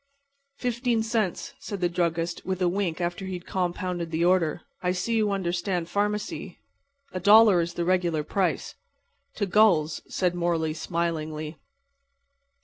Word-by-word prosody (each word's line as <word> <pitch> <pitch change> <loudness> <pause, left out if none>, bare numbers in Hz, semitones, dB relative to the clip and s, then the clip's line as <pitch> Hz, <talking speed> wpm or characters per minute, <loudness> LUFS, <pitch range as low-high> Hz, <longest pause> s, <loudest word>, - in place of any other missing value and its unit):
"Fifteen 240 -2 0
cents," 220 -5 -1
said 200 - -5
the 180 - +2
druggist, 170 -1 -1
with 185 -1 -2
a 180 - +2
wink 180 -2 -1
after 175 +2 -2
he 190 - -4
had 175 - -8
compounded 180 -1 -2
the 165 +1 0
order. 175 -4 +2 0.2
"I 180 0 +1
see 210 +6 -1
you 215 -2 +2
understand 180 -2 -1
pharmacy. 210 +2 -2 0.5
A 185 - -3
dollar 205 -1 +7
is 170 0 -4
the 170 - -1
regular 175 -4 +1
price." 190 +4 -1 0.6
"To 205 - 0
gulls," 180 -6 +3
said 180 -2 0
Morley, 170 -3 0
smilingly. 155 -2 -3
180 Hz, 140 wpm, -26 LUFS, 170-200 Hz, 0.6 s, dollar